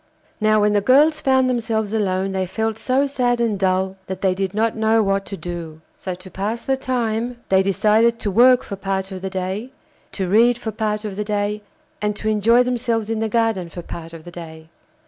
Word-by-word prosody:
Now 215 -1 +3
when 210 0 +3
the 205 - +3
girls 295 +7 +4
found 260 -1 +3
themselves 225 -4 -1
alone 195 -3 0
they 190 -1 -1
felt 220 +3 -2
so 265 +2 +1
sad 250 -3 0
and 225 -4 0
dull 190 0 0
that 190 0 -5
they 190 -2 +2
did 190 +1 -3
not 225 +1 +1
know 220 0 +3
what 195 0 0
to 195 - -6
do. 170 -3 -7 0.2
So, 185 -2 -5
to 185 +1 -13
pass 210 +6 -3
the 270 - +1
time, 240 -2 -2
they 190 0 +5
decided 215 +4 +3
to 205 - -1
work 245 +5 +5
for 200 - -6
part 195 0 -3
of 185 -1 -6
the 190 - -3
day, 190 +5 -4 0.4
to 190 -2 -2
read 230 +5 +4
for 230 -2 -5
part 210 0 -2
of 200 -2 -5
the 210 - -1
day, 210 0 -2 0.4
and 210 0 -1
to 215 +1 -3
enjoy 225 +3 +4
themselves 235 -3 -1
in 225 - -1
the 220 0 -1
garden 225 -6 0
for 175 +1 -8
part 165 0 -8
of 165 -1 -11
the 175 - -10
day. 160 -2 -10
210 Hz, 215 wpm, -21 LUFS, 190-230 Hz, 0.4 s, they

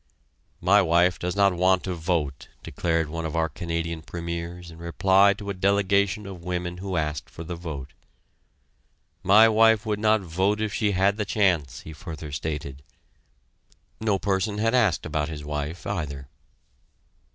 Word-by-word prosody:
"My 100 +4 +5
wife 85 0 +3
does 90 +1 -3
not 100 -1 +4
want 90 +1 +2
to 95 - -3
vote," 80 -5 -2 0.2
declared 85 -2 -1
one 85 +2 -5
of 80 0 -4
our 80 -1 +2
Canadian 85 +1 -4
premiers 85 +1 -6
in 80 - -13
reply 95 +4 +4
to 100 0 -5
a - - -3
delegation 100 +1 +1
of 95 -3 -9
women 90 0 -3
who 95 -1 -3
asked 75 -2 -2
for 80 - -9
the 85 - -6
vote. 75 -6 -7 1.3
"My 100 +4 +7
wife 110 0 +4
would 105 -1 -1
not 110 0 +3
vote 95 +4 0
if 110 -1 -2
she 105 -3 +1
had 100 +2 +2
the 105 - 0
chance," 90 -9 +1
he 80 - -10
further 80 -2 -8
stated. 70 -1 -5 1.2
No 110 -3 +1
person 100 +2 -1
had 115 +2 +1
asked 110 -9 +2
about 75 0 -2
his 75 -2 -7
wife, 75 +3 -4
either. 70 -8 -4
90 Hz, 160 wpm, -25 LUFS, 80-100 Hz, 1.3 s, My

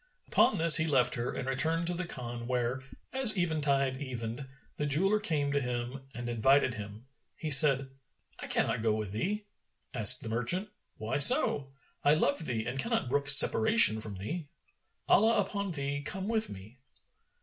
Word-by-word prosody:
Upon - - +1
this 165 -1 +9
he 160 - +2
left 135 -5 +1
her 120 +1 -4
and 130 - -7
returned 160 +6 0
to 175 - -3
the 175 0 -6
Khan 120 -5 -8
where, 125 +1 -3 0.3
as 260 -6 +5
eventide 145 -6 -2
evened, 125 0 -7 0.3
the 150 - -3
jeweller 190 +9 0
came 150 -8 -3
to 140 0 -1
him 125 +1 -6
and 120 0 -7
invited 130 +3 +1
him. 105 +2 -11 0.3
He 155 - -6
said, 135 -2 +5 0.5
"I - - -8
cannot 120 - -2
go 110 -1 -1
with 105 -3 -6
thee." 205 - -4 0.5
Asked 125 +2 +4
the 115 - -7
merchant, 125 - -2 0.3
"Why 110 +4 -4
so? 145 - +5 0.3
I 145 +1 +3
love 150 +1 -2
thee 115 -3 -4
and 125 +3 -6
cannot 230 - -3
brook 140 +1 -2
separation 135 - +4
from 105 -2 -6
thee. 145 - -7 0.6
Allah 225 +3 +2
upon 200 0 -4
thee 140 -3 -5
come 190 +7 -6
with 220 -1 -1
me!" 105 +7 -13
140 Hz, 170 wpm, -28 LUFS, 120-165 Hz, 0.6 s, this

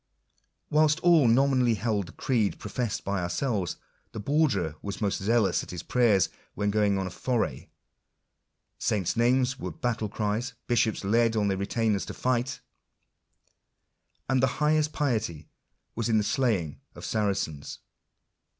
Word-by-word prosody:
Whilst 155 0 +4
all 170 -7 +5
nominally 125 -1 +3
held 105 -3 -1
the - - -11
creed 115 -6 0
professed 110 +1 -3
by 100 -1 -1
ourselves, 95 - -1 0.4
the - - -5
Borderer 110 - +1
was 100 -1 -5
most 100 -3 -1
zealous 110 0 +2
at - - -10
his 90 -3 -6
prayers 115 -7 +3 0.3
when 105 0 0
going 105 -1 +2
on 95 - -1
a 95 - -5
foray; 120 +4 -2 1.1
saints' 100 -2 0
names 125 +2 +2
were 90 - -4
battle 110 +5 -2
cries; 110 +4 -2
bishops 115 -3 +1
led 115 +3 +2
on 105 -2 +1
their 95 - 0
retainers 105 0 0
to - - -6
fight; 130 +1 -1 1.7
and 130 0 +2
the 135 - +4
highest 150 0 +2
piety 115 - -2 0.4
was 115 +1 -2
in 110 - +3
the 105 - +2
slaying 105 - 0
of - - -8
Saracens. 100 -9 -2
110 Hz, 140 wpm, -27 LUFS, 100-125 Hz, 1.7 s, all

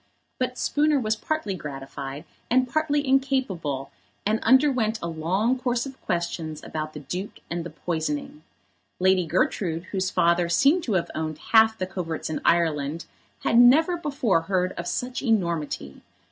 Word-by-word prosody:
But 255 0 -1
Spooner 295 0 +2
was 220 -3 0
partly 220 -3 -2
gratified, 140 -2 -7 0.2
and 255 +1 +3
partly 295 0 0
incapable, 255 - 0 0.3
and 215 +2 +2
underwent 255 -3 +3
a 170 - -4
long 185 +10 0
course 245 -1 0
of 270 -1 -10
questions 170 -3 -3
about 155 0 -5
the 150 - -7
Duke 180 +8 -6
and 170 0 -2
the 170 - -6
poisoning. 155 -2 -3 0.6
Lady 185 -1 +3
Gertrude, 170 0 0
whose 190 -2 0
father 170 -1 +2
seemed 280 - +4
to 225 - -1
have 180 -3 0
owned 155 -1 -3
half 220 0 +6
the 185 - -2
coverts 175 -4 -4
in - - -3
Ireland, 160 -2 +1 0.4
had 230 - +4
never 305 +9 +6
before 275 - 0
heard 185 +1 0
of 170 -1 -6
such 250 +5 -3
enormity. 170 - -1
185 Hz, 150 wpm, -25 LUFS, 160-250 Hz, 0.6 s, half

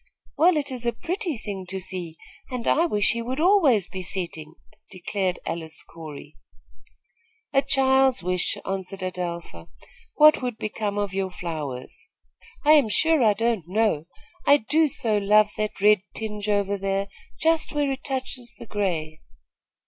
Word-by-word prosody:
"Well, 340 0 +4
it 285 -2 -2
is 245 -2 -4
a 235 - +1
pretty 345 - -3
thing 195 -4 -6
to 190 +1 -4
see, 175 -3 -5 0.3
and 250 -3 -4
I 335 +3 +4
wish 205 -9 +3
he 235 - -2
would 255 +4 -4
always 310 - +4
be 185 - -6
setting," 170 -4 -4 0.3
declared 185 0 -2
Alice 160 -1 -5
Corey. 155 -2 -11 1.2
"A 275 - +5
child's 265 -3 +3
wish," 180 0 0
answered 195 0 -4
Adelpha. 170 - -5 0.5
"What 305 -1 +6
would 245 -3 -3
become 210 -1 -3
of 205 -2 -1
your 190 -1 -1
flowers?" 155 -8 -6 0.6
"I 300 - +6
am 290 -7 +6
sure 320 +4 +3
I 215 -2 +5
don't 225 -5 0
know. 190 -5 +1 0.4
I 285 - +8
do 305 +6 +2
so 220 -6 0
love 210 +1 +4
that 215 -2 -3
red 210 -1 +5
tinge 210 -1 -4
over 200 -1 +1
there, 195 0 -1 0.3
just 325 0 +2
where 290 -2 0
it 270 0 -5
touches 260 -3 -4
the - - -10
gray." 170 -8 -2
210 Hz, 155 wpm, -25 LUFS, 185-265 Hz, 1.2 s, I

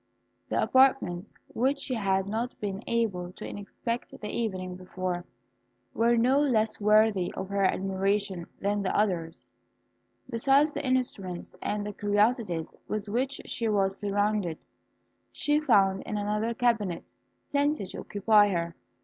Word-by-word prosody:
The - - 0
apartments 260 -9 +3 0.2
which 265 +5 +1
she 280 -2 -2
had 195 -4 +1
not 225 +5 -3
been 200 0 -4
able 195 -7 -1
to - - -8
inspect 230 +4 -5
the 210 - -8
evening 185 -5 -3
before, 185 -1 -4 0.7
were 235 +1 +3
no 255 +4 +4
less 220 -7 +1
worthy 210 -3 +4
of 190 0 -5
her 200 0 0
admiration 195 -1 0
than 205 +1 0
the 190 - 0
others. 175 -6 -1 0.8
Besides 275 +6 +3
the - - -4
instruments 240 -9 -2
and 205 -1 -3
curiosities 205 - +1
with 215 -1 -3
which 260 +5 -1
she 230 -2 -1
was 195 -2 +1
surrounded, 205 -4 0 0.7
she 295 0 +2
found 195 -10 +3
in 210 - -4
another 210 +3 -1
cabinet 225 -8 +1 0.5
plenty 285 -4 +1
to 185 - -8
occupy 205 0 +4
her. 170 -3 -2
205 Hz, 130 wpm, -28 LUFS, 190-235 Hz, 0.8 s, no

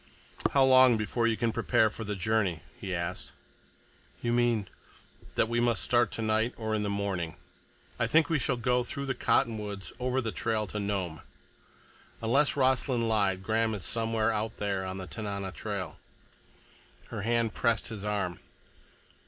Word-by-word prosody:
"How 135 - +4
long 130 -2 +7
before 115 +2 0
you 110 -1 +1
can 115 -1 +1
prepare 110 -1 +2
for 115 - -6
the 105 -1 -3
journey?" 95 -4 0
he 95 - -6
asked. 85 +1 -4 0.9
"You 120 0 +1
mean—" 120 -4 +2 0.7
"That - - +3
we 120 +1 0
must 120 -1 +2
start 120 -1 +3
tonight 110 +1 0
or 110 -1 -2
in 110 - +1
the 105 - -1
morning. 100 -5 -2 0.6
I - - +2
think 160 -1 +4
we 165 -3 +1
shall 125 -1 0
go 125 +1 +2
through 140 +3 -4
the 135 - 0
cottonwoods 105 -5 0
over 125 +1 0
the 115 -3 -2
old - - -8
trail 110 -1 0
to 105 +2 -5
Nome. 95 -6 -2 1.0
Unless 135 +6 +3
Rossland 130 -3 +2
lied, 100 -4 +1
Graham 110 +1 +1
is 100 - -5
somewhere 115 -1 +1
out 110 +1 -2
there 100 -2 -1
on 95 0 -4
the 95 - -5
Tanana 100 +3 -4
trail." 100 -4 -5 1.1
Her 110 -3 -4
hand 115 0 +1
pressed 115 -2 +1
his 110 -3 -6
arm. 100 -4 -2
110 Hz, 165 wpm, -29 LUFS, 100-120 Hz, 1.1 s, long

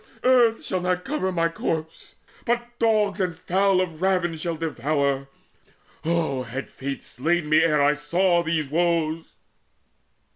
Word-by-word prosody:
Earth 245 -3 +4
shall 185 -2 -2 0.2
cover 230 +2 -3
not 185 - -2
my 165 -1 +2
corpse, 160 -1 -4 0.3
But 240 0 -1
dogs 215 -3 +2
and 180 -3 -1
fowl 190 +1 +2
of 165 -3 -4
ravin 180 -3 +1
shall 165 +1 -3
devour. 140 -3 -1 0.7
Oh 160 -5 0
had 125 +2 -6
Fate 135 +1 -6
slain 165 +5 -1
me 155 +1 +5
ere 155 -3 +3
I 145 +1 +4
saw 170 +4 +1
these 160 -3 -1
woes!" 165 0 0
165 Hz, 140 wpm, -24 LUFS, 150-185 Hz, 0.7 s, me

